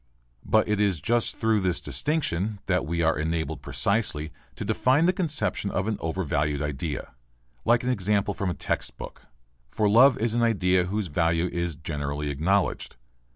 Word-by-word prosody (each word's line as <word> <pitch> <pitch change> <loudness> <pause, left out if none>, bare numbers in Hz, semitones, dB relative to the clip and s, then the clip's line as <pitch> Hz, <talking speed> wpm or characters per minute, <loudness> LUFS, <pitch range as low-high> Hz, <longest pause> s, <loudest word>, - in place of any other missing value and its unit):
But 110 - +2
it 105 -1 +1
is 100 -6 +1
just 115 +9 +1
through 110 -1 +2
this 90 -3 0
distinction 110 - -1
that 90 -7 0
we 85 +1 -1
are 80 -2 +2
enabled 80 -2 -2
precisely 80 -2 -1 0.2
to - - -5
define 135 +6 +2
the 180 - +3
conception 155 - -1
of 95 +1 -1
an 110 -2 -1
overvalued 75 -4 -1
idea. 75 0 -4 0.5
Like 120 +1 +3
an 125 - +1
example 100 -2 0
from 100 -1 -2
a 90 - -2
text - - -3
book. - - -10 0.4
For 105 - +1
love 125 +5 +6
is 115 -3 0
an 120 - +1
idea 95 -6 +2
whose 105 +3 -2
value 85 +1 +1
is 85 -2 -2
generally 75 -2 -3
acknowledged. 90 +8 0
95 Hz, 165 wpm, -26 LUFS, 80-110 Hz, 0.5 s, love